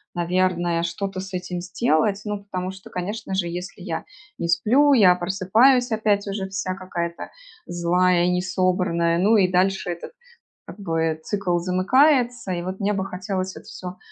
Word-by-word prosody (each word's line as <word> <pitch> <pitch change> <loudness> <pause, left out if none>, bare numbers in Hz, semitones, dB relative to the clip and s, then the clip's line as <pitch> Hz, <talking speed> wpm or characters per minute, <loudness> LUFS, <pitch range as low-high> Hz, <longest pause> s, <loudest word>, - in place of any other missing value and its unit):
наверное, 175 -1 0
что-то 185 +3 -3
с 190 0 -7
этим 180 -1 -4
сделать. 190 +1 +1
Ну 205 -1 -4
потому 185 -1 -4
что, 190 0 -13
конечно 195 +3 -5
же, 180 -2 0
если 180 +2 -7
я - - -4 0.3
не 170 - -2
сплю, 235 +13 +4
я 200 -8 +7
просыпаюсь 215 +8 +3
опять 215 -2 +1
уже 195 -1 -3
вся 190 -1 -3
какая-то 175 -2 -5 0.3
злая 175 +1 +2
и 180 - +2
не 180 0 +1
собранная. 180 -3 +1
Ну 210 +5 +4
и 185 -3 +3
дальше 190 +1 +1
этот, 170 - -8 0.5
как 195 - -11
бы 165 -4 -1
цикл 190 -3 -1
замыкается. 240 - +2
И 175 - -3
вот 185 +2 -5
мне 205 0 0
бы 190 -1 -2
хотелось 185 0 -4
это - - -12
всё 180 0 -8
185 Hz, 165 wpm, -23 LUFS, 175-200 Hz, 0.5 s, я